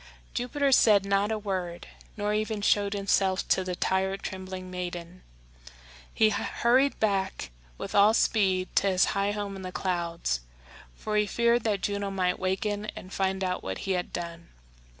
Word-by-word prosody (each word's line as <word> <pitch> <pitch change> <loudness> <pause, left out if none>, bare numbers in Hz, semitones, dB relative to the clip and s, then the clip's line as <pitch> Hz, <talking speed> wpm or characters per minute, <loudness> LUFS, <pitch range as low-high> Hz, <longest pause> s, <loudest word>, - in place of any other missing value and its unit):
Jupiter 275 +3 0
said 210 -6 +5
not 200 +2 +1
a 220 - 0
word, 185 -4 -4 0.3
nor 210 0 0
even 215 -1 -1
showed 205 -1 +2
himself 195 -1 +1
to 190 - +3
the 180 -1 -3
tired, 190 +2 0
trembling 185 -1 -6
maiden. 175 -1 -6 0.9
He 220 - +4
hurried 255 +6 +2
back 195 - -1 0.3
with - - -6
all 205 +2 +6
speed 190 -5 +1
to 200 - +4
his 185 -1 +4
high 200 0 +1
home 205 -1 -4
in 190 - -8
the 185 -1 -6
clouds, 170 - -1 0.6
for 210 0 -2
he 210 0 +2
feared 235 +2 +2
that 205 -3 0
Juno 200 0 -1
might 185 -2 0
waken 205 +2 -1
and 185 - -9
find 190 0 0
out 180 -1 -1
what 95 0 -4
he 195 - -1
had 180 -1 -1
done. 170 -1 -6
195 Hz, 165 wpm, -28 LUFS, 185-210 Hz, 0.9 s, all